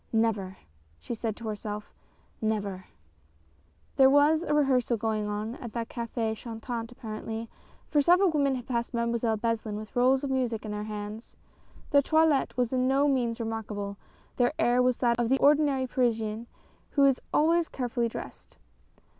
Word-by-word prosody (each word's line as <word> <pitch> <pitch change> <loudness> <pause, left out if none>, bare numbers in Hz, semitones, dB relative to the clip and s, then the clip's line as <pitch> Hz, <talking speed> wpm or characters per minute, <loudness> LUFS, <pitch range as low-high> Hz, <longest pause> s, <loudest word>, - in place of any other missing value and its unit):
" - - -38
Never! 195 -4 -3 0.2
" 75 0 -35
she - - -5
said 225 -2 -3
to 230 -1 -8
herself, 210 0 -5 0.3
" - - -36
never! 200 -3 -5 0.5
" 80 0 -36
There 265 -1 +7
was 290 +3 +5
a 320 - -3
rehearsal 265 -5 +2
going 215 -1 -1
on 210 +3 -3
at 235 -5 -8
the 235 -1 -2
Cafe 230 -1 -3
Chantant 230 +1 -6
apparently, 225 -1 -6 0.4
for 295 - +3
several 355 +4 +5
women 280 -3 +2
had 245 -2 -6
passed 235 0 -2
Mademoiselle 235 -1 0
Beslin 225 -1 -2
with 215 +2 -9
rolls 260 +2 +3
of 275 - -2
music 245 -4 -1
in 215 - -4
their 210 0 -4
hands. 210 +1 -7 0.6
Their 285 - +6
toilette 315 -2 +2
was 245 0 0
in 255 0 +2
no 275 +2 +3
degree 245 -4 +1
remarkable, 210 -3 -4 0.4
their 245 +2 +2
air 245 +1 +3
was 250 -1 +2
that 240 -1 +1
of 235 -1 +1
the 265 - +4
ordinary 285 -2 +3
Parisian 230 -3 -1 0.5
who 280 - +6
is 270 -2 +3
always 330 +2 +3
carefully 240 -2 -1
dressed. - - -9
235 Hz, 170 wpm, -28 LUFS, 215-265 Hz, 0.6 s, There